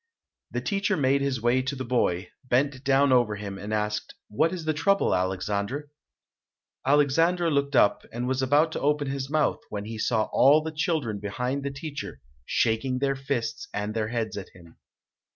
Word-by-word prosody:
The - - -3
teacher 200 -1 0
made 140 -1 +2
his 135 -4 -1
way 120 +2 +3
to 130 +2 -3
the 130 - -4
boy, 90 -7 0
bent 130 +1 0
down 140 0 +3
over 120 -4 +3
him, 100 -1 -6
and 105 - -6
asked, 105 -1 -2
"What 155 +10 +2
is 175 -4 -5
the 155 - +1
trouble, 195 +6 +2
Alexandre?" 100 +10 -2 0.9
Alexandre 165 +5 +3
looked 140 -1 0
up 105 -4 +4
and 120 +2 -3
was 130 0 0
about 145 +5 +3
to - - -3
open 145 0 +1
his 135 -1 -4
mouth, 155 0 +1
when 105 -1 -5
he 110 0 -6
saw 110 -1 +1
all 145 +4 +6
the 160 - -4
children 155 - -1
behind 125 +7 -2
the 140 - -2
teacher 145 +1 -7 0.3
shaking 120 +3 +1
their 135 +1 0
fists 135 -4 -3
and 105 +1 -2
their 110 -1 -1
heads 115 -2 -3
at 100 - -7
him. 85 -2 -16
130 Hz, 180 wpm, -26 LUFS, 110-145 Hz, 0.9 s, all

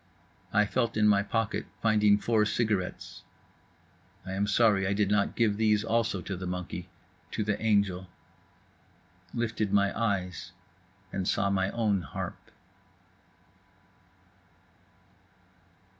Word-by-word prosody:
I 105 - +4
felt 115 +1 -1
in 105 -1 +4
my 100 -1 +5
pocket, 115 -1 -2
finding 105 -2 +4
four 110 0 +2
cigarettes. 105 -4 -2 1.0
I 95 - -6
am 100 +2 0
sorry 100 -2 +3
I 100 - +1
did 100 0 +1
not 100 -1 +1
give 105 -4 +2
these 105 -1 +3
also 115 -4 0
to 95 - -4
the 90 +1 -5
monkey—to 90 +1 -6
the 105 -1 -1
angel. 100 -4 +1 1.2
Lifted 115 -3 -2
my 100 -1 +2
eyes 95 -4 -2 0.6
and 95 -1 -2
saw 100 0 +1
my 95 0 +1
own 105 -4 0
harp. 70 - -7
100 Hz, 115 wpm, -29 LUFS, 95-110 Hz, 1.2 s, my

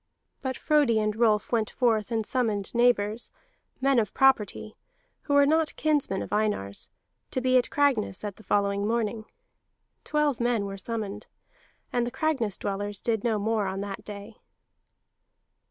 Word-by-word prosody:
But 260 -1 -3
Frodi 290 -7 +3
and 215 -1 0
Rolf 220 -2 +2
went 225 -3 +1
forth 225 -4 +1
and 225 -2 -1
summoned 215 -6 -1
neighbors, 235 -2 +2 0.5
men 270 -1 +3
of 210 -3 -2
property, 220 -5 +2 0.5
who 285 - -1
were 285 0 +6
not 315 +2 +2
kinsmen 290 -11 0
of - - -7
Einar's, 210 - -1 0.4
to - - -1
be 255 0 +2
at 245 - -2
Cragness 255 -9 +1
at 205 -2 -5
the 220 - -15
following 200 0 +1
morning. 225 -1 -1 0.8
Twelve 300 -4 0
men 235 -3 +1
were 195 0 -5
summoned. 210 0 -5 0.7
And 240 -1 +1
the - - -4
Cragness 265 -7 0
dwellers 205 0 -3
did 225 -3 -1
no 225 -3 +1
more 215 0 0
on 190 +1 -3
that 200 -1 -6
day. 210 +1 -9
220 Hz, 155 wpm, -27 LUFS, 205-255 Hz, 0.8 s, were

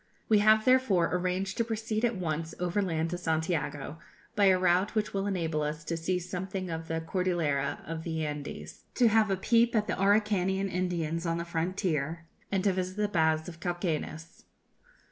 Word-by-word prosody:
We 215 -2 +5
have 215 +1 +5
therefore 255 -10 +3
arranged 185 +1 -1
to 230 - +2
proceed 220 0 -2
at 240 -1 +2
once 165 -2 -3
overland 175 -3 0
to 175 - -3
Santiago, 160 -3 -2 0.4
by 205 -2 +4
a 190 -1 +6
route 185 +3 +2
which 215 -1 0
will 195 0 -1
enable 165 -6 -1
us 150 +1 -3
to 165 - -3
see 165 +3 -1
something 185 +1 -4
of 160 0 -5
the 165 0 -2
Cordillera 165 -5 -1
of 165 0 -5
the 160 -1 -2
Andes, 150 -1 -6
to 240 -3 +5
have 220 -1 +3
a 195 - +1
peep 235 +4 +3
at 215 -1 +2
the - - -1
Araucanian 195 -2 +2
Indians 170 -2 -2
on 165 0 0
the 170 - -3
frontier, 170 -2 -2 0.3
and 195 -2 +1
to 200 -2 +3
visit 185 +1 -3
the 210 0 +1
baths 160 -3 +2
of 170 -2 -9
Cauquenes. 165 -2 -4
180 Hz, 180 wpm, -29 LUFS, 160-195 Hz, 0.4 s, a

